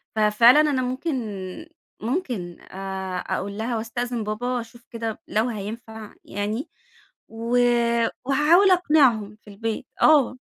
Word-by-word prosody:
ففعلًا 220 +5 +6
أنا 290 -4 +1
ممكن 255 +6 -2 0.9
ممكن 225 - -3
آآ 190 -1 -5
أقول 200 +1 -3
لها 230 +2 -2
وأستأذِن 235 +1 -3
بابا، 245 +4 -2
أشوف 235 +1 -14
كده 230 -2 -4
لو 220 +3 +1
هينفع 220 0 -7
يعني، 210 +6 -4 0.6
و 230 +2 -1 0.7
وهاحاول 305 +8 +5
أقنِعهم 270 - +3
في - - -15
البيت. 225 +4 -4 0.2
آه. 290 -5 +5
230 Hz, 115 wpm, -24 LUFS, 210-255 Hz, 0.9 s, ففعلًا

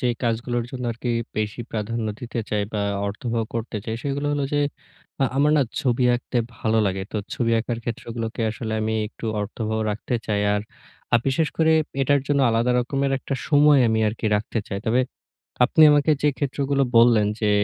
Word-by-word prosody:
যে 125 - 0 0.2
কাজগুলোর 120 +1 -1
জন্য 125 -1 -5
আরকি 120 +2 -6 0.3
বেশি 105 +2 -2
প্রাধান্য 110 +1 -2
দিতে 120 -1 -5
চাই 105 -1 +1
বা 105 - -1 0.3
অর্থবহ 115 +3 -2
করতে 115 -1 -3
চাই 110 - -3
সেগুলো 145 +1 -2
হলো 145 -1 0
যে 145 - +2 0.6
আ - - +5
আমার 145 +2 +4
না 145 - +5 0.2
ছবি 125 -1 +1
আঁকতে 120 0 -2 0.2
ভালো 110 0 +1
লাগে। 95 0 -1
তো - - -2 0.2
ছবি 115 -2 0
আঁকার 115 0 -3
ক্ষেত্রগুলোকে 115 0 -4
আসলে 110 0 -5
আমি 110 +1 -1
একটু 115 - -8
অর্থবহ 110 +1 -3
রাখতে 110 +4 -3
চাই। 105 -1 0
আর 105 - 0 0.5
আ - - +9
বিশেষ 150 +4 +2
করে 160 -1 +4 0.3
এটার 140 +1 +3
জন্য 140 -1 +2
আলাদা 115 +2 +2
রকমের 135 +2 -1
একটা 135 - -4
সময় 145 -1 +6
আমি 110 0 +1
আরকি 110 +1 -3
রাখতে 110 +2 -3
চাই। 100 - -3
তবে 120 +3 +3 0.6
আপনি 155 +5 +4
আমাকে 145 +1 +4
যে 150 - +4
ক্ষেত্রগুলো 140 0 0
বললেন 115 -3 +6
যে, 105 - +2
120 Hz, 180 wpm, -23 LUFS, 110-135 Hz, 0.6 s, আ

